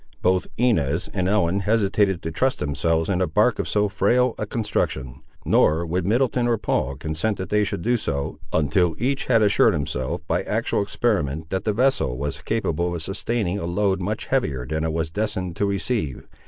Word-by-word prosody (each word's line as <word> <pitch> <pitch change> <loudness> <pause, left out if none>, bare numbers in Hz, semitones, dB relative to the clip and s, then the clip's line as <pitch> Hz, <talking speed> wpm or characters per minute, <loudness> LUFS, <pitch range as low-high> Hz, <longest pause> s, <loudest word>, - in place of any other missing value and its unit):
Both 90 0 +2
Inez 105 - +1
and 90 - 0
Ellen 95 -2 +2
hesitated 100 -2 +1
to 80 - -3
trust 130 +11 +1
themselves 80 +3 0
in 95 -2 0
a 90 - +2
bark 105 +9 +2
of - - -1
so 105 0 +2
frail 115 +5 +2
a 105 - -2
construction, 65 - -2 0.2
nor 80 +3 +3
would 90 +2 -1
Middleton 120 +2 +2
or 120 -1 +2
Paul 70 -9 -1
consent 80 +9 -1
that 95 -1 -5
they 105 0 +3
should 90 -4 -3
do 120 +1 +2
so, 70 -10 -3
until 80 +2 +2
each 135 +4 -1
had 115 -4 +4
assured 100 - +4
himself, 75 +2 -3
by - - +1
actual - - -1
experiment, 80 - -1
that 95 +1 -2
the 110 - +2
vessel 125 - +1
was 70 +2 -4
capable 85 0 -1
of 85 - -4
sustaining 100 0 -2
a 85 - -3
load 95 +1 0
much 105 +4 -2
heavier 75 - -1
than 80 +4 -2
it 80 - 0
was 80 0 -2
destined 100 -3 -2
to 100 - +1
receive. 100 - -2
95 Hz, 190 wpm, -23 LUFS, 80-105 Hz, 0.2 s, had